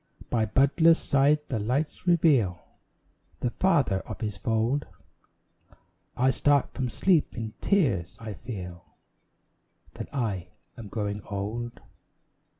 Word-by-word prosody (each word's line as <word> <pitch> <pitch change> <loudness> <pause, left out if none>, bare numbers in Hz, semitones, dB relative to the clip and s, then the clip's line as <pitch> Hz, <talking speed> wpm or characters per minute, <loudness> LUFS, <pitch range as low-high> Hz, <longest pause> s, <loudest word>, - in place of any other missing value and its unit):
By 115 -2 +2
Butler's 150 - +4
side 145 +2 +2
the 115 - -2
lights 135 - -2
reveal 145 - +3 0.8
The 120 - 0
father 145 - +2
of - - -9
his 105 -3 -2
fold, 115 +8 0 1.3
I 130 +2 +4
start 140 +2 +2
from 130 -2 -2
sleep 165 - +2
in 110 -1 -4
tears, 125 - +1
and 110 -3 -6
feel 90 -7 -7 1.1
That - - -7
I 105 -10 -2 0.3
am 115 -4 -9
growing 105 0 -3
old. 110 +4 -4
120 Hz, 115 wpm, -27 LUFS, 105-145 Hz, 1.3 s, Butler's